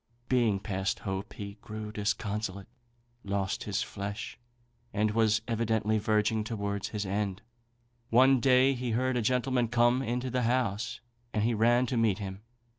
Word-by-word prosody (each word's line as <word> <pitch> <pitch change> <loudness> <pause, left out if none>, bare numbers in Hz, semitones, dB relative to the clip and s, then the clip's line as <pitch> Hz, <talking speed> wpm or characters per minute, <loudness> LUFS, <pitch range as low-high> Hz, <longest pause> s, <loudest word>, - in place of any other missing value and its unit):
Being 115 -6 +3
past 95 -1 -2
hope, 95 +1 -4
he 100 0 -8
grew 110 0 -6
disconsolate, 105 -1 -2 0.6
lost 100 -1 -2
his 105 0 -1
flesh, 100 +3 -6 0.5
and 105 +1 +1
was 110 -1 +2
evidently 110 -2 +1
verging 105 +1 +1
towards 100 -2 -3
his 105 -1 -3
end. 100 +1 -2 0.7
One 130 +3 +6
day 130 +2 +5
he 125 -2 -2
heard 130 0 +1
a 120 - +1
gentleman 125 +1 +1
come 120 +2 +3
into 125 +1 -2
the 125 0 0
house, 120 -1 0 0.3
and 105 - +2
he 115 +2 +2
ran 120 +3 +4
to 125 0 -2
meet 110 -4 +3
him. 95 -1 -6
110 Hz, 150 wpm, -30 LUFS, 100-120 Hz, 0.7 s, One